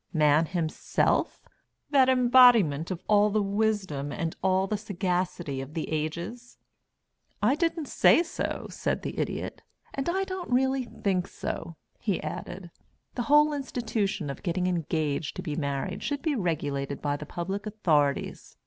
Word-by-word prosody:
Man 155 0 +4
himself 170 -3 0 0.5
that 265 -3 +5
embodiment 240 - +5
of 185 -3 -5
all 210 0 +5
the 210 0 +1
wisdom 195 -9 -1
and 165 +2 -3
all 190 0 +2
the 210 - -1
sagacity 180 - -2
of 135 +4 -9
the 160 - -3
ages?" 170 +10 -4 0.8
"I 215 +6 +3
didn't 330 +1 0
say 335 - +5
so," 335 - -4
said - - -2
the - - -4
Idiot. - - -3 0.3
"And 275 +4 -2
I 380 +3 +1
don't 375 -2 -5
really 265 +1 +2
think 190 -5 -1
so," 165 - -5 0.2
he 200 -5 -1
added. 175 0 -6 0.4
"The 245 - -2
whole 295 +1 +6
institution 225 - -2
of - - -9
getting 180 -1 -1
engaged 160 -4 -1
to 185 - -5
be 155 -5 -3
married 140 +5 -2
should 285 0 -3
be 315 -2 +1
regulated 145 - -2
by 145 -1 -1
the 150 0 -7
public 190 +5 -4
authorities. 155 -10 0
190 Hz, 150 wpm, -27 LUFS, 160-245 Hz, 0.8 s, whole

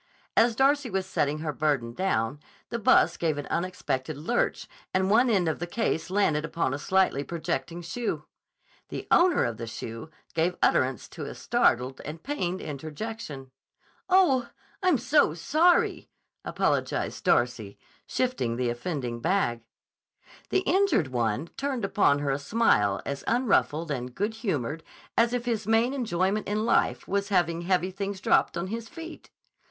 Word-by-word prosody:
As 230 -1 +4
Darcy 275 +1 +3
was 190 -2 -1
setting 150 -5 0
her 155 -2 -2
burden 135 -6 0
down, 135 -6 -1 0.3
the 235 - -3
bus 215 - +4
gave 160 -3 0
an 145 - -4
unexpected 155 -5 -2
lurch 200 +12 -1 0.3
and 190 +1 +2
one 240 +4 +5
end 190 -6 +2
of 160 - -1
the 175 - -3
case 185 -3 -1
landed 180 -6 +2
upon 165 -4 -1
a 140 - -3
slightly 190 -6 +2
projecting 165 +1 -4
shoe. 225 +8 -3 0.6
The - - -5
owner 355 0 +5
of 115 -2 -3
the 115 - -6
shoe 115 +5 -7 0.2
gave 170 +2 0
utterance 130 -2 +2
to - - -7
a - - -7
startled 130 +2 +1
and 155 +2 -8
pained 185 -11 -2
interjection. 150 - -6 0.6
"Oh, 355 -10 +4 0.3
I'm 370 -1 +3
so - - +3
sorry!" 345 +3 +2 0.3
apologized - - -1
Darcy, - - +1 0.3
shifting 250 - -1
the 125 0 0
offending 120 -2 -4
bag. 130 -7 0 0.9
The 380 - +2
injured 355 - +2
one 120 +5 -1
turned 270 -6 -2
upon 195 -8 +3
her 145 -1 -1
a 135 - -1
smile 140 - +2
as 140 0 -4
unruffled 195 - +1
and 125 -2 -4
good 210 +3 -1
humored 160 - -2 0.3
as 230 0 +3
if 245 -1 -2
his 225 -4 -2
main 225 +4 +3
enjoyment 210 -5 0
in 215 +2 0
life - - +1
was 200 +1 -1
having 170 -3 +1
heavy 185 +1 +1
things 195 0 -4
dropped - - +2
on 170 - -2
his 225 +3 -5
feet. 330 -1 -10
180 Hz, 155 wpm, -27 LUFS, 140-225 Hz, 0.9 s, one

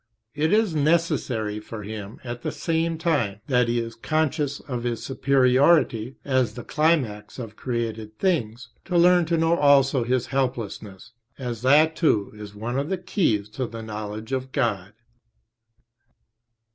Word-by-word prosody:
It 155 +2 0
is 215 -4 +3
necessary 145 -9 0
for 105 0 -8
him, 105 0 -7
at 120 -1 -6
the - - -3
same 165 0 -1
time 140 - 0
that 125 -3 +2
he 120 0 +1
is 115 0 -4
conscious 145 +3 -1
of 125 -4 -5
his 120 -1 -3
superiority 130 -1 +3
as 130 -5 +1
the 120 - -7
climax 150 -10 0
of 115 -4 -7
created 110 -3 -4
things, 120 - -1 0.2
to 180 -2 0
learn 175 0 +5
to 165 +1 0
know 165 +1 +3
also 140 -4 +4
his 125 +1 0
helplessness, 115 -6 -3 0.3
as 120 -4 -5
that 150 +5 +4
too 110 - +1
is 105 -1 -10
one 120 +5 -3
of 145 +3 -3
the 190 - 0
keys 175 - 0
to 120 +3 -4
the 115 0 -8
knowledge 110 +1 -6
of 130 0 -3
God. 105 -8 -1
125 Hz, 150 wpm, -24 LUFS, 110-155 Hz, 0.3 s, learn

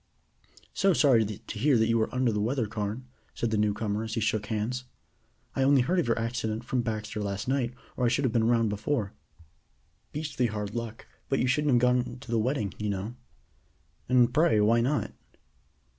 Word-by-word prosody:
"So 195 -1 +3
sorry 130 -8 +5
to 105 +1 -7
hear 140 +1 +4
that 110 0 +3
you 115 0 +2
are 110 - -1
under 130 -2 +1
the 105 -1 -1
weather 120 +2 0
Carne," 105 +3 -4 0.3
said 115 - -1
the 110 - +1
new 105 0 +3
comer 105 +1 -2
as 110 0 -4
he - - 0
shook 110 -1 0
hands. 115 +4 -2 0.7
"I - - 0
only 135 0 +5
heard 175 +9 +1
of 165 - 0
your 115 - +1
accident 115 -1 -2
from 125 +1 -1
Baxter 110 -2 -3
last 100 +1 -3
night 125 -2 0 0.2
or 125 - 0
I - - +4
should 130 +4 +1
have 120 - 0
been 115 -1 +2
round 115 -2 +3
before. 105 0 -2 1.0
Beastly 145 -5 -1
hard 105 -2 -4
luck, 115 -1 -5 0.2
but 135 - +2
you - - +1
shouldn't 140 +2 +2
have - - +5
gone 125 0 +1
to 125 - -10
the 115 - +2
wedding, 110 -3 -1
you 105 0 -2
know!" 100 +3 -3 1.0
"And, 125 -1 +4
pray, 150 -8 +4
why 115 +3 +4
not?" 140 +5 0
115 Hz, 200 wpm, -28 LUFS, 110-125 Hz, 1.0 s, sorry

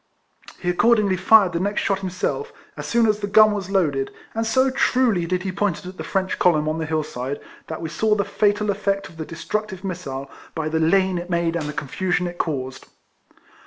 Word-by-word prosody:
He 175 - -6
accordingly 205 +2 +3
fired 190 0 +5
the 170 - 0
next 200 +3 0
shot 195 -1 0
himself, 190 - -3 0.2
as - - -6
soon 235 -1 +3
as 210 -1 +2
the 205 - -3
gun 215 +1 +6
was 200 -3 -3
loaded, 150 -9 +1 0.2
and 225 0 -1
so 260 +4 +3
truly 250 -9 +2
did 180 +1 -1
he 190 - -2
point 200 -2 0
it - - -12
at 185 +1 -8
the - - -5
French 190 -1 -1
column 155 -4 +3
on 155 +1 -1
the 160 - -3
hill 155 0 0
side, 135 0 -5 0.3
that 160 - -5
we 160 - -3
saw 215 +5 +1
the 200 -2 0
fatal 205 0 +1
effect 195 -4 -1
of 165 - -16
the 160 - -4
destructive 190 +4 -4
missile, 155 -8 -5 0.3
by 160 -1 -2
the 160 +1 0
lane 185 +2 +3
it 175 +1 -8
made 170 -1 0
and 155 -3 -2
the - - -2
confusion 180 +6 -1
it 175 0 -6
caused. 130 -4 -3
185 Hz, 215 wpm, -22 LUFS, 160-205 Hz, 0.3 s, gun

